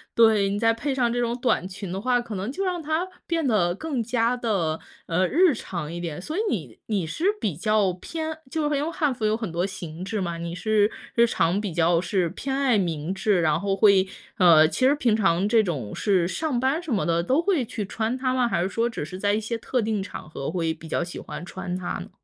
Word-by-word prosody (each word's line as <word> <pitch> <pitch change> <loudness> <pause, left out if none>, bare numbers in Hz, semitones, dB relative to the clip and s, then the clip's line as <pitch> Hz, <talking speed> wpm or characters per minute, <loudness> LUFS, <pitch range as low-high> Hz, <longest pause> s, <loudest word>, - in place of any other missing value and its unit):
对， 220 -4 +5
你 200 - -1
再 225 0 +4
配 270 +4 -2
上 240 -3 +2
这 245 - -1
种 240 +1 -1
短 230 -8 +1
裙 190 -1 -7
的 190 +1 -3
话， 250 0 +2
可 235 -3 -6
能 195 +7 -3
就 390 +6 -3
让 355 -2 -1
它 315 +4 -1 0.2
变 330 -3 0
得 175 -7 +2
更 280 -2 -2
加 235 +1 +1
地， 195 -10 -1 0.3
呃， 180 +2 +2
日 345 - +4
常 170 -8 -5
一 175 - -4
点。 165 -2 -4
所 310 - -5
以 - - 0
你 - - -4
你 200 -6 0
是 320 - -3
比 185 -8 -1
较 205 0 +2
偏 315 - -5
就 310 0 -1
是 295 - +1
因 280 - 0
为 330 - -2
汉 295 -6 0
服 225 - -8
有 215 +1 +2
很 220 -6 -4
多 175 +2 0
形 175 -2 -7
制 210 +2 -3
嘛， 170 -2 -2
你 170 0 -4
是 215 +1 +2 0.2
日 235 0 +6
常 180 +1 +1
比 195 -6 -4
较 170 0 +3
是 185 -3 0
偏 270 +9 -4
爱 265 -5 +3
明 170 -2 -1
制， 195 -1 +2
然 155 -2 +2
后 195 -1 0
会 195 -2 +5 0.3
呃， 160 -4 +7
其 - - -5
实 285 - +4
平 235 -7 +2
常 195 -2 +2
这 225 0 +5
种 135 - -3
是 185 -5 +2
上 290 - -1
班 270 +6 +1
什 320 -6 -6
么 195 - +1
的 170 0 +2
都 270 - +2
会 345 -8 +1
去 215 -2 -4
穿 225 +5 -2
它 255 -1 0
吗？ 250 -2 +2
还 170 - +1
是 - - 0
说 230 +2 0
只 225 - -5
是 185 +4 -8
在 205 0 +2
一 215 - +1
些 225 +2 -3
特 250 +2 -1
定 215 -2 -1
场 185 -5 -8
合 140 -2 -4
会 165 -3 0
比 160 0 -12
较 - - 0
喜 175 - -7
欢 175 - -7
穿 180 -1 -5
它 180 -1 -3
呢？ - - -8
210 Hz, 265 characters per minute, -25 LUFS, 175-250 Hz, 0.3 s, 呃